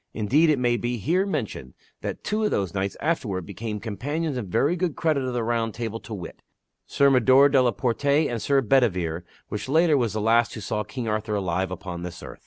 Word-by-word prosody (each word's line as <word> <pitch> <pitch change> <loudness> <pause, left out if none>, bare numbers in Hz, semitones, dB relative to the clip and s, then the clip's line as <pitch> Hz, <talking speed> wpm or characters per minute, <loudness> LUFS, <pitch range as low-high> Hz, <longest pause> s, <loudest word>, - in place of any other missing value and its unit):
Indeed 135 +10 +3
it 150 - +3
may 120 -1 +1
be 120 +1 -2
here 175 - +1
mentioned 105 - -4 0.3
that - - -5
two 215 +1 -1
of 210 - +2
those 95 - -1
knights 100 0 -2
afterward 105 - -1
became 110 +2 -5
companions 145 +9 -3
in 120 -5 -4
very 145 - +1
good 175 -4 -1
credit 155 -5 +1
of 130 -1 -3
the 120 - 0
round 115 -1 -1
table 115 -1 -4
to 115 - -9
wit: 90 -4 -9 0.5
Sir 140 0 +3
Mador 130 +2 +6
de 135 -2 +4
la 125 - +3
Porte, 115 +5 -2
and 140 -5 +2
Sir 140 -1 +2
Bedevere 95 -10 +1 0.3
which 105 +3 -5
latter 160 +1 +4
was 115 -5 0
the 110 - -2
last 115 +2 +2
who - - -6
saw 105 +1 -2
King 125 -1 -6
Arthur 105 0 -1
alive 95 -1 -1
upon 90 -1 -6
this 90 0 -7
earth. - - -10
120 Hz, 215 wpm, -25 LUFS, 105-140 Hz, 0.5 s, Mador